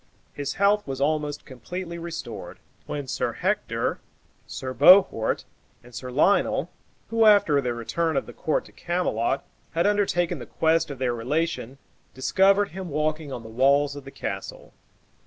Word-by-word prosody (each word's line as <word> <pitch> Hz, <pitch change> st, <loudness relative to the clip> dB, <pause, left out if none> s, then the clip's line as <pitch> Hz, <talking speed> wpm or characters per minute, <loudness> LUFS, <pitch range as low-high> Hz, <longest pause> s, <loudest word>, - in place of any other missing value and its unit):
His 140 Hz, -1 st, -4 dB
health 200 Hz, 0 st, +2 dB
was 135 Hz, -1 st, -4 dB
almost 150 Hz, 0 st, -1 dB
completely 170 Hz, +6 st, -7 dB
restored, 170 Hz, 0 st, -7 dB, 0.3 s
when 145 Hz, -1 st, -4 dB
Sir -, -, -2 dB
Hector, -, -, -1 dB, 0.5 s
Sir 130 Hz, -1 st, -5 dB
Bohort, 180 Hz, -, +5 dB, 0.4 s
and 120 Hz, 0 st, -16 dB
Sir 125 Hz, +2 st, -6 dB
Lionel, 150 Hz, +10 st, +2 dB, 0.4 s
who, 225 Hz, 0 st, +3 dB
after 200 Hz, -9 st, +5 dB
the 125 Hz, -2 st, -2 dB
return 160 Hz, +7 st, -1 dB
of -, -, 0 dB
the -, -, -11 dB
court 155 Hz, -, -1 dB
to -, -, -15 dB
Camelot, 140 Hz, -7 st, -1 dB, 0.3 s
had 165 Hz, +1 st, +1 dB
undertaken 200 Hz, -4 st, +1 dB
the -, -, -9 dB
quest 160 Hz, 0 st, +1 dB
of 140 Hz, -, -6 dB
their 125 Hz, -1 st, 0 dB
relation, 135 Hz, +1 st, -2 dB, 0.4 s
discovered 195 Hz, +9 st, +3 dB
him 185 Hz, 0 st, -7 dB
walking 155 Hz, 0 st, -1 dB
on 120 Hz, -3 st, -6 dB
the 110 Hz, -, -10 dB
walls 140 Hz, +4 st, +3 dB
of 145 Hz, -, -8 dB
the 135 Hz, -, -10 dB
castle. 135 Hz, -, -6 dB
150 Hz, 155 wpm, -25 LUFS, 130-175 Hz, 0.5 s, Bohort